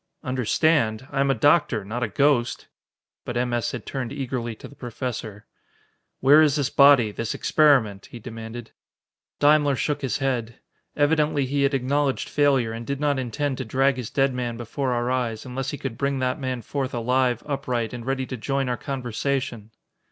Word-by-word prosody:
"Understand? 130 -2 +1
I 135 - -2
am 140 0 +2
a 135 - +3
doctor 145 - +3
not 115 +5 -4
a - - +1
ghost!" 140 -5 +1 0.6
But 120 - -4
M. 120 0 0
S. 120 -1 0
had - - -6
turned 130 -3 -4
eagerly 130 -4 -3
to - - -11
the - - -15
Professor. 120 -5 -6 0.8
"Where 145 +4 +7
is 150 -3 +4
this 145 -2 0
body 140 -6 +6
this 115 +2 -3
experiment?" 130 -10 +3
he - - -10
demanded. 115 0 -8 0.7
Daimler 145 -1 +4
shook 145 +2 -1
his 135 -1 -1
head. 125 -5 -2 0.4
Evidently 150 -1 +2
he 140 +2 -1
had 140 0 +2
acknowledged 135 +1 0
failure 135 -6 +2
and 115 +1 -7
did 140 -1 -2
not 145 -2 +1
intend 130 +2 -2
to 130 - -3
drag 135 +3 +2
his 125 -3 -5
dead 135 -2 +1
man 120 -2 -3
before 125 +3 -3
our 120 0 0
eyes, 120 -4 -2
unless 130 +1 -4
he 145 - -4
could 125 -4 -6
bring 140 0 0
that 130 +2 -1
man 130 -3 -3
forth 135 +1 -3
alive, 125 0 +1
upright, 130 -6 -2
and 120 -1 -6
ready 135 0 -1
to 130 - -6
join 135 +3 -1
our 120 - -1
conversation! 130 -3 -3
130 Hz, 180 wpm, -24 LUFS, 120-140 Hz, 0.8 s, Where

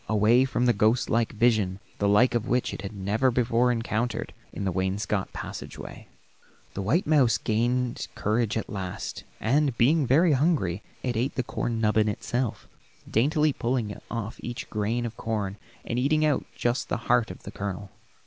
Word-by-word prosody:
Away 110 +4 +4
from 125 -1 0
the 120 - +4
ghost 110 +4 +2
like 115 -1 +2
vision, 110 -5 +2 0.2
the 100 - +2
like 105 +5 +5
of 120 0 -1
which 125 0 0
it - - -6
had 100 - -5
never 105 +5 +1
before 125 0 +2
encountered, 115 0 -2 0.2
in 100 - -4
the 95 - +1
wainscot 95 +2 -1
passageway. - - -8 0.7
The 100 - -3
white 130 - +1
mouse 135 -8 +4
gained 120 +3 0
courage 110 +1 0
at 110 - -3
last, 95 -3 -5 0.2
and 135 +1 +1
being 140 +3 +4
very 160 +7 +5
hungry 135 - +1 0.2
it 125 -2 -1
ate 125 +5 -1
the 130 - 0
corn 115 -1 -2
nubbin 110 -1 +3
itself, 120 +3 -2 0.4
daintily 150 +5 +2
pulling 115 -4 -1
off 115 -1 -4
each 120 0 -6
grain 110 +3 -1
of 115 -1 -5
corn, 105 -3 -2 0.3
and 120 - -1
eating 155 +4 +2
out 150 -3 +1
just 120 +2 -1
the - - 0
heart 125 -2 +3
of 90 - -10
the - - -7
kernel. 100 0 -5
115 Hz, 170 wpm, -27 LUFS, 105-125 Hz, 0.7 s, like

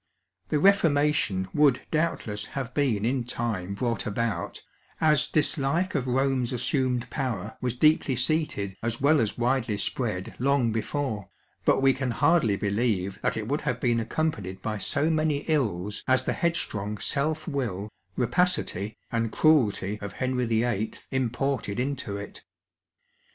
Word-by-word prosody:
The 150 - +2
Reformation 150 - +3
would 145 -4 +4
doubtless 155 -10 -1
have 130 -2 -3
been 120 -8 +1
in 125 +1 +1
time 110 -6 -3
brought 115 0 -1
about, 115 +1 -2 0.4
as 150 -2 +3
dislike 155 +4 +1
of 135 -4 -1
Rome's 130 -1 +1
assumed 125 0 0
power 110 -6 -3
was 125 -1 -1
deeply 155 -1 +3
seated 125 -8 0
as 115 0 -2
well 145 +1 +4
as 110 - -1
widely 120 -3 +1
spread 105 -5 -2
long 130 -2 +2
before, 110 -3 -2 0.4
but - - +3
we 135 -1 +6
can 130 -1 -2
hardly 145 -4 +3
believe 100 -2 -1
that - - 0
it 110 -1 -3
would 145 +4 -1
have 125 -5 -2
been 120 -2 +2
ac 115 - -3
companied 105 - -2
by 110 -1 -2
so 145 +9 +1
many 155 -2 +1
ills 105 - -1
as 130 -1 +4
the - - 0
headstrong 105 -11 -1
self 155 - 0
will, 115 - -2 0.3
rapacity, 125 - 0
and 115 -1 0
cruelty 105 -9 +2
of 100 - -6
Henry 130 -1 -1
YIII. 115 -1 0
imported 130 -3 -1
into 130 -6 -2
it. 100 0 -8
125 Hz, 145 wpm, -27 LUFS, 105-145 Hz, 0.4 s, we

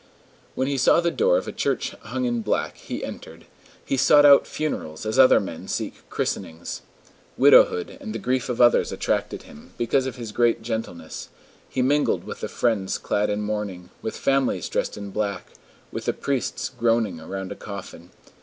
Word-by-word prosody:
When 130 - 0
he 140 -1 -1
saw 140 - +5
the 170 0 +1
door - - +3
of - - -3
a - - -3
church - - -1
hung 255 - -3
in 240 -1 0
black, 75 - -1
he - - -6
entered: 80 +1 -10 0.4
he 135 - -1
sought 145 +2 +6
out 140 -1 +7
funerals 95 - -4
as 110 +4 0
other 130 - +8
men 90 -5 -7
seek - - -5
christenings. 80 +1 -4 0.6
Widowhood 90 - +5
and 110 - -6
the 115 - -3
grief 125 +4 -1
of 125 - -2
others 120 -1 +5
attracted - - -2
him, 75 - -15
because 130 +3 +1
of 130 - -5
his 115 -4 -7
great 120 0 +2
gentleness; 110 -6 -5 0.4
he 130 - 0
mingled 145 +3 +2
with - - -7
the - - -3
friends 105 -5 0
clad 105 +1 0
in 105 0 -1
mourning, 100 -4 -4
with 110 - -4
families 135 - +1
dressed - - -2
in 100 -1 -7
black, 100 -3 -3 0.4
with - - -5
the - - +1
priests 135 -1 -2
groaning 115 -7 +1
around 95 +4 -6
a - - -4
coffin. 100 -4 -9
115 Hz, 180 wpm, -24 LUFS, 95-135 Hz, 0.6 s, other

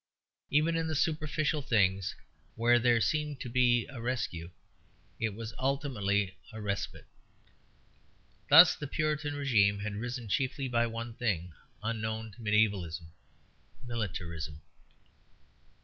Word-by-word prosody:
Even 155 +3 +3
in 165 0 0
the 160 - -2
superficial 155 0 0
things 100 -8 +1 0.4
where 120 +1 +4
there 120 -1 +4
seemed 150 +2 0
to - - -5
be 120 -1 +3
a 135 -5 -9
rescue 115 -9 -3 0.7
it 110 -3 -1
was 115 0 -6
ultimately 105 -8 0 0.2
a 110 - -8
respite. 100 -2 -3 1.4
Thus 160 +4 +10
the 145 - -6
Puritan 150 0 -1
régime 105 -8 +2
had 105 0 -3
risen 120 +1 -4
chiefly 135 +4 -1
by 120 -1 +1
one 115 +1 -5
thing 95 -8 -2 0.3
unknown 110 0 -3
to 115 - -18
mediævalism 100 -7 +1 0.7
militarism. 85 -9 -4
115 Hz, 115 wpm, -31 LUFS, 100-140 Hz, 1.4 s, Thus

